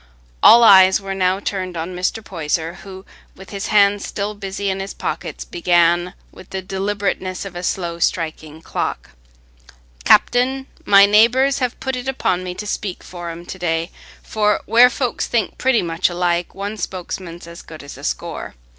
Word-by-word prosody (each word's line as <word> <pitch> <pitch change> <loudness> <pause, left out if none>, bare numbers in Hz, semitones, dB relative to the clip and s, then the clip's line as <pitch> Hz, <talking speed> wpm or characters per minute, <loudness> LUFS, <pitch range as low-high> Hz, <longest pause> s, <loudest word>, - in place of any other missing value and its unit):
All 235 +1 +8
eyes 190 -3 +7
were 195 -1 -5
now 185 0 +1
turned 185 -3 -4
on 170 +3 -5
Mr. 185 +5 -2
Poyser, 165 0 -3
who, 190 0 -11 0.3
with 190 - -13
his 200 -1 -4
hands 205 -1 +3
still 205 +1 -3
busy 200 0 -5
in 190 0 -1
his 195 +1 -6
pockets, - - -5
began 175 +1 +1 0.2
with 185 - -15
the 190 -1 -5
deliberateness 195 -1 -3
of 190 -2 -9
a 175 - -5
slow 170 -2 -3
striking 160 -2 -2
clock. - - -4 0.9
"Captain, 260 - +3 0.2
my 200 0 +7
neighbours 240 +7 +4
have 250 -3 -2
put 265 -1 -3
it 250 +1 -6
upo' 260 -8 0
me 180 0 -6
to 210 - -6
speak 205 -2 -4
for 175 -1 -8
'em 170 +1 -8
to 185 - -8
day, 165 -1 -1 0.3
for 210 -1 0
where 235 +3 +6
folks 250 -1 -2
think 235 -2 -1
pretty 255 -5 +2
much 165 +2 0
alike, 175 0 -1
one 205 +2 -5
spokesman's 180 -2 -6
as 170 0 -11
good 155 -2 -12
as 145 - -10
a - - -13
score. - - -4
190 Hz, 170 wpm, -19 LUFS, 175-205 Hz, 0.9 s, All